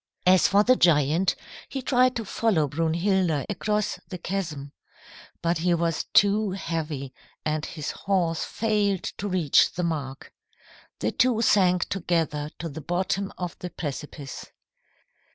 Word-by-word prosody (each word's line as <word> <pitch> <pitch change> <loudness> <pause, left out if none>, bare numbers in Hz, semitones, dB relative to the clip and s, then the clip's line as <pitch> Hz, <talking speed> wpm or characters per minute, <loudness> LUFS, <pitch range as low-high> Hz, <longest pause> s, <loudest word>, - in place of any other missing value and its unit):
"As 185 0 +6
for 200 +1 +4
the 255 +3 +5
giant, 165 - +3 0.3
he 270 -2 -4
tried 255 0 +3
to 225 - -3
follow 190 -8 +1
Brunhilda 165 +1 +1
across 210 +1 -1
the 185 - -5
chasm. 165 -6 -4 0.7
But 170 0 +1
he 175 +1 +2
was 165 -1 -1
too 205 0 +4
heavy 155 -7 -4 0.3
and 155 0 -1
his 150 -3 -5
horse 175 -4 0
failed 210 -4 0
to 205 - -4
reach 180 -7 +3
the 180 - -2
mark. 145 -5 -4 0.6
The - - -1
two 245 -3 +2
sank 180 -4 +3
together 165 -5 -1
to 165 - -5
the 160 0 -7
bottom 185 +5 -1
of 180 -2 -4
the 180 - -5
precipice." 145 -3 -6
175 Hz, 135 wpm, -26 LUFS, 155-200 Hz, 0.7 s, As